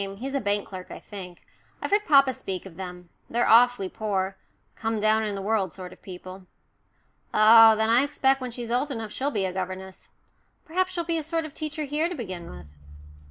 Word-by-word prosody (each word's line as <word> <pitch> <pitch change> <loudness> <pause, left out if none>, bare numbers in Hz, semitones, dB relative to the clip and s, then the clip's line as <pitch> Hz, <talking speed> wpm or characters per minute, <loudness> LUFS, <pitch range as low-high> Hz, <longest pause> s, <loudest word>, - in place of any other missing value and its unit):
He's 265 +5 -5
a 275 - 0
bank 205 0 0
clerk, 185 -2 -9
I - - -8
think. 185 -4 -10 0.3
I've - - -4
heard 415 +1 +2
papa 275 -3 +6
speak 190 -5 -5
of 185 -4 -11
them. 180 -1 -8 0.2
They're 240 +1 +1
awfully 240 -3 +5
poor 195 -2 -2 0.4
come 225 -1 -2
down 215 +1 +3
in 205 -1 -3
the 195 - -5
world 200 -4 0
sort 185 -1 -9
of - - -20
people." 185 0 -10 0.9
"Oh, 220 +1 +8
then, 220 +1 +1
I 240 +3 +5
expect 270 -2 +1
when 255 - -3
she's 235 -1 -6
old 255 +4 +1
enough 225 -5 -5
she'll 275 +5 -1
be 205 -9 -1
a 185 - -3
governess 185 0 -6 0.6
perhaps 370 +3 0
she'll 345 -2 -2
be 335 0 0
a - - -2
sort 325 +1 -2
of 305 - -9
teacher 310 0 -4
here 300 +4 -1
to 355 - -5
begin 185 - -6
with." 75 - -12
220 Hz, 205 wpm, -26 LUFS, 190-275 Hz, 0.9 s, Oh